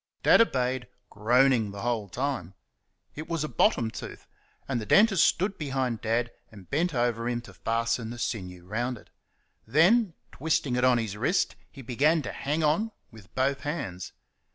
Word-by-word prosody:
Dad -, -, +7 dB
obeyed, 130 Hz, -, 0 dB, 0.2 s
groaning 120 Hz, +1 st, +3 dB
the 100 Hz, 0 st, -7 dB
whole 115 Hz, -4 st, -1 dB
time. 100 Hz, -6 st, -3 dB, 0.6 s
It 155 Hz, +1 st, -8 dB
was 165 Hz, -3 st, -1 dB
a -, -, -2 dB
bottom 115 Hz, -3 st, +2 dB
tooth, -, -, -9 dB, 0.4 s
and 125 Hz, -4 st, -1 dB
the -, -, -5 dB
dentist 200 Hz, -4 st, +5 dB
stood 195 Hz, +3 st, +1 dB
behind 135 Hz, -6 st, -2 dB
Dad 115 Hz, +1 st, 0 dB, 0.2 s
and 100 Hz, -4 st, -14 dB
bent 160 Hz, +2 st, 0 dB
over 120 Hz, -1 st, 0 dB
him 120 Hz, -1 st, -1 dB
to 120 Hz, -, -14 dB
fasten 115 Hz, 0 st, -1 dB
the 120 Hz, -, -7 dB
sinew 90 Hz, -7 st, -4 dB
round 120 Hz, +6 st, -2 dB
it. -, -, -18 dB, 0.6 s
Then, 175 Hz, -, +4 dB, 0.2 s
twisting 145 Hz, -3 st, 0 dB
it 125 Hz, -, 0 dB
on 130 Hz, -1 st, +5 dB
his 110 Hz, -4 st, -3 dB
wrist, 145 Hz, -, 0 dB, 0.2 s
he 135 Hz, -, -11 dB
began 145 Hz, +6 st, +2 dB
to -, -, -4 dB
"hang 150 Hz, +3 st, -2 dB
on" 160 Hz, +9 st, +2 dB, 0.2 s
with 110 Hz, -5 st, -16 dB
both 135 Hz, +2 st, +1 dB
hands. 115 Hz, -, -5 dB
125 Hz, 170 wpm, -27 LUFS, 115-150 Hz, 0.6 s, Dad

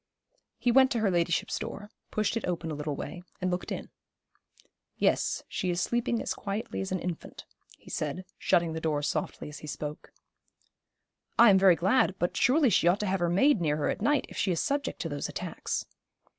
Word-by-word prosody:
He 245 Hz, -, +2 dB
went 260 Hz, +1 st, +6 dB
to 235 Hz, -, 0 dB
her 205 Hz, -3 st, +2 dB
ladyship's 170 Hz, -1 st, 0 dB
door, 205 Hz, 0 st, -7 dB, 0.2 s
pushed 215 Hz, +1 st, 0 dB
it 230 Hz, -, -2 dB
open 170 Hz, -2 st, -2 dB
a -, -, -2 dB
little 150 Hz, 0 st, -3 dB
way, 175 Hz, -, -6 dB, 0.2 s
and 185 Hz, 0 st, -1 dB
looked 180 Hz, -, -3 dB
in. -, -, -5 dB, 1.1 s
'Yes, -, -, +1 dB
she 185 Hz, -, -2 dB
is 175 Hz, 0 st, 0 dB
sleeping 235 Hz, +3 st, 0 dB
as -, -, -2 dB
quietly 205 Hz, +2 st, -4 dB
as 190 Hz, -, -4 dB
an 185 Hz, -, +1 dB
infant,' 175 Hz, -1 st, -6 dB, 0.3 s
he -, -, -14 dB
said, 155 Hz, +5 st, -3 dB
shutting 170 Hz, -2 st, +2 dB
the 160 Hz, -, -4 dB
door 150 Hz, -2 st, 0 dB
softly -, -, -2 dB
as 150 Hz, -, -8 dB
he 150 Hz, -, -9 dB
spoke. 150 Hz, +2 st, -6 dB, 1.3 s
'I 235 Hz, -2 st, +8 dB
am 190 Hz, -, +5 dB
very 190 Hz, -2 st, +7 dB
glad; 190 Hz, -, +2 dB
but 175 Hz, -, -1 dB
surely 270 Hz, 0 st, +4 dB
she 175 Hz, -, +3 dB
ought 180 Hz, +4 st, +4 dB
to -, -, -1 dB
have 190 Hz, -1 st, 0 dB
her 175 Hz, 0 st, +1 dB
maid 200 Hz, +5 st, +4 dB
near 150 Hz, -2 st, +1 dB
her 150 Hz, -, 0 dB
at -, -, -2 dB
night, 295 Hz, 0 st, +2 dB
if -, -, -11 dB
she 190 Hz, -, +1 dB
is 170 Hz, -, 0 dB
subject 285 Hz, +1 st, -1 dB
to -, -, -3 dB
those -, -, -3 dB
attacks.' -, -, -4 dB
185 Hz, 205 wpm, -29 LUFS, 165-220 Hz, 1.3 s, I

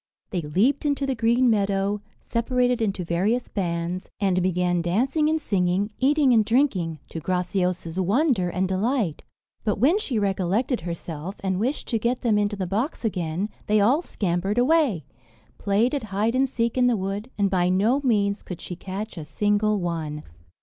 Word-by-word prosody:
They 180 Hz, -4 st, -1 dB
leaped 195 Hz, -, +1 dB
into 285 Hz, -2 st, 0 dB
the 270 Hz, -, 0 dB
green 235 Hz, +2 st, +2 dB
meadow, 200 Hz, -2 st, +1 dB, 0.2 s
separated 245 Hz, +1 st, 0 dB
into 195 Hz, -4 st, -1 dB
various 200 Hz, +9 st, 0 dB
bands, 175 Hz, -1 st, -3 dB
and 190 Hz, -3 st, +2 dB
began 180 Hz, -1 st, +1 dB
dancing 255 Hz, -, +1 dB
and 320 Hz, 0 st, +1 dB
singing, 195 Hz, -4 st, 0 dB
eating 275 Hz, 0 st, +4 dB
and 220 Hz, -2 st, +5 dB
drinking, 210 Hz, -, +1 dB
to 165 Hz, -, -5 dB
Graciosa's 180 Hz, 0 st, -1 dB
wonder 205 Hz, -, +2 dB
and 185 Hz, +2 st, -1 dB
delight. 195 Hz, -, 0 dB, 0.4 s
But 210 Hz, -, 0 dB
when 305 Hz, -, +3 dB
she 270 Hz, -, -2 dB
recollected 200 Hz, +5 st, 0 dB
herself, 170 Hz, +1 st, -6 dB
and 190 Hz, -1 st, -1 dB
wished 255 Hz, +7 st, -1 dB
to 230 Hz, -, +1 dB
get 240 Hz, +3 st, 0 dB
them 220 Hz, -4 st, +2 dB
into 205 Hz, 0 st, 0 dB
the 195 Hz, -2 st, -3 dB
box 220 Hz, -, -2 dB
again, 180 Hz, -2 st, -1 dB, 0.2 s
they 215 Hz, 0 st, +3 dB
all 250 Hz, +10 st, +4 dB
scampered 190 Hz, -, -2 dB
away, 250 Hz, -, +3 dB, 0.5 s
played 210 Hz, +6 st, +1 dB
at 275 Hz, -6 st, -2 dB
hide 210 Hz, +3 st, 0 dB
and 265 Hz, +1 st, +2 dB
seek 235 Hz, 0 st, -1 dB
in 250 Hz, -, +5 dB
the 240 Hz, -2 st, +2 dB
wood, 200 Hz, +4 st, -4 dB
and 200 Hz, -2 st, +1 dB
by 180 Hz, -2 st, +2 dB
no 215 Hz, +9 st, +2 dB
means 205 Hz, -5 st, +1 dB
could 180 Hz, -, -8 dB
she 180 Hz, -, -6 dB
catch 195 Hz, +2 st, -6 dB
a -, -, -6 dB
single 210 Hz, +4 st, +1 dB
one. 160 Hz, -4 st, -3 dB
205 Hz, 170 wpm, -24 LUFS, 180-245 Hz, 0.5 s, and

